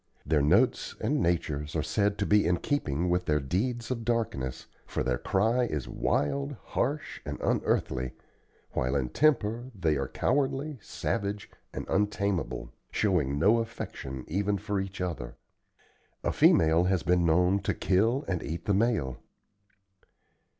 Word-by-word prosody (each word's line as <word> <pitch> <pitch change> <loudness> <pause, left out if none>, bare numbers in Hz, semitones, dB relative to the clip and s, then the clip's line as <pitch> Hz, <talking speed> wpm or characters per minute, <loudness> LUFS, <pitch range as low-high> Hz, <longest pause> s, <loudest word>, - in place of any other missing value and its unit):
Their 75 -2 +2
notes 70 - +3
and - - 0
natures 75 -3 -1
are 80 - +1
said 100 +2 +1
to - - 0
be 105 -4 +4
in 90 0 +2
keeping 85 - -1
with 90 0 0
their 75 -1 +3
deeds 115 - -2
of 115 -2 -2
darkness; 110 - -2 0.2
for - - -2
their 65 -2 0
cry 115 +6 +2
is 75 - -3
wild, 70 -1 0
harsh, - - -2
and - - -5
unearthly, 65 0 0 0.6
while 65 +2 0
in 65 -3 0
temper 120 - +2
they 80 -6 +1
are 70 -1 -2
cowardly, 135 - 0
savage, 100 0 -3 0.2
and - - -5
untamable, 100 - -1 0.2
showing 80 -10 +1
no 105 +9 +4
affection 65 - -5
even 100 +4 0
for 105 0 -2
each 95 -1 -5
other. 80 -10 -4 0.9
A - - +1
female 80 +2 +5
has 95 -2 +1
been 90 0 +3
known 90 +4 +3
to 100 - -1
kill 110 - +2
and 90 -3 -1
eat 85 +4 -5
the 100 - +2
male. 95 - +1
90 Hz, 145 wpm, -29 LUFS, 75-110 Hz, 0.9 s, female